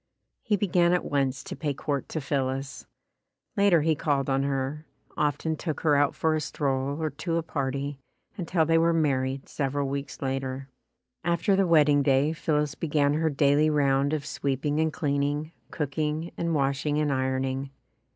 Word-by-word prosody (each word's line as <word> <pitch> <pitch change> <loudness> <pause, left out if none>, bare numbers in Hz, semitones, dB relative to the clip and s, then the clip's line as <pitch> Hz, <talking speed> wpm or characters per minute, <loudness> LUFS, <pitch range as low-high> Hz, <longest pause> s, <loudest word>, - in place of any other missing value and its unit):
He 215 - +1
began 175 -3 +3
at 180 - +1
once 140 -1 0
to - - -7
pay 145 -4 -2
court 140 -1 -3
to 160 - -3
Phillis. 135 +1 -3 0.7
Later 200 -6 +4
he 160 0 +3
called 140 -2 0
on 135 0 +2
her, 140 +2 -2 0.3
often 150 +2 0
took 155 0 -4
her 150 -3 +3
out 145 0 +2
for 160 -1 +1
a 155 - 0
stroll 140 -1 -1
or 155 -1 -1
to 165 +4 -2
a 165 - -1
party 140 -2 -3 0.4
until 170 -3 0
they 165 +1 +3
were 165 +1 +3
married 135 -4 0
several 140 0 -2
weeks 140 +1 -4
later. 135 0 -3 0.5
After 170 +3 +2
the 195 -1 +2
wedding 150 -3 +5
day, 140 +2 +3
Phillis 150 -2 0
began 145 -2 +1
her 160 +1 +1
daily 145 +1 +3
round 140 -1 +2
of 155 -2 -2
sweeping 145 +1 -1
and 160 0 +2
cleaning, 145 0 -1 0.2
cooking 150 +2 -2
and 170 -1 -1
washing 140 +1 0
and 150 -2 +1
ironing. 130 +1 -1
145 Hz, 165 wpm, -27 LUFS, 135-160 Hz, 0.7 s, wedding